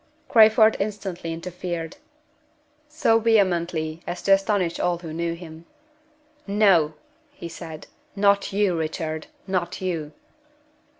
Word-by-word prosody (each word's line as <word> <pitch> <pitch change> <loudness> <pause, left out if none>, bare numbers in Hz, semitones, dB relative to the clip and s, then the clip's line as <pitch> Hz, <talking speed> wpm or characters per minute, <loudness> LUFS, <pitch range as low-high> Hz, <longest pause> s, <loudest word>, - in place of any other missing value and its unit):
Crayford 220 -1 +6
instantly 195 -5 -4
interfered 170 0 -5 0.9
so 300 -7 +2
vehemently 175 -7 +1
as 175 - -5
to 195 - +1
astonish 195 -3 +2
all 175 -1 +1
who 165 -2 -8
knew 170 +1 -2
him. 165 -1 -11 0.8
"No!" 195 -7 +3 0.4
he 290 -12 -8
said. 160 -2 -9 0.3
"Not 200 0 +2
you, 200 -2 +1
Richard! 160 -1 -3 0.2
not 185 -2 -2
you!" 165 -5 -3
180 Hz, 110 wpm, -24 LUFS, 165-200 Hz, 0.9 s, Crayford